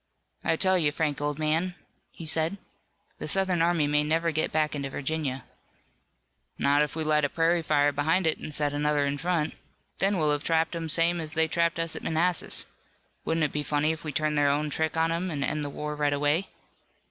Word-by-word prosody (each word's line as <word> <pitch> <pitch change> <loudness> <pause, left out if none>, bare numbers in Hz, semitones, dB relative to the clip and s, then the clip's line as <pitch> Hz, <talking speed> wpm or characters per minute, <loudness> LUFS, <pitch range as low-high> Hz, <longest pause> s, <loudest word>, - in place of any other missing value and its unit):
"I - - +2
tell 185 +2 +3
you, 150 -3 +2
Frank, 150 -1 -1
old 145 -1 -1
man," 160 +4 0 0.3
he 165 - -9
said, 160 +4 +1 0.6
"the - - -4
Southern 190 -3 +2
army 170 -2 +3
may 150 0 +2
never 165 +2 +1
get 155 0 0
back 155 -1 +1
into 140 -2 -3
Virginia." 140 -2 -3 1.1
"Not 145 +1 +3
if 150 0 -1
we 160 - -1
light 155 -1 +2
a 145 - +2
prairie 165 +2 +2
fire 145 -2 +2
behind 160 +6 +1
it 160 - +1
and - - -7
set 145 -1 -1
another 145 0 +1
in 140 0 -2
front. 170 -2 0 0.5
Then 195 0 +2
we'll 155 -3 +2
have 145 -1 0
'em - - -10
trapped 165 +1 +1
same 170 +2 +3
as 155 -1 -4
they 160 0 +2
trapped 170 +1 +1
us 165 -1 -1
at - - -5
Manassas. 170 +2 0 0.6
Wouldn't 160 0 +1
it 150 - +1
be 150 - -1
funny 150 +2 +1
if 160 0 -6
we'd 150 -3 -5
turn 155 0 +1
their 145 -1 +3
own 150 +1 0
trick 160 +2 -1
on 165 0 +2
'em, 175 +3 -1
and 145 -4 -2
end 150 +2 -1
the 145 - -3
war 150 +1 -5
right 145 -1 +1
away?" 145 +6 +1
155 Hz, 215 wpm, -27 LUFS, 145-165 Hz, 1.1 s, tell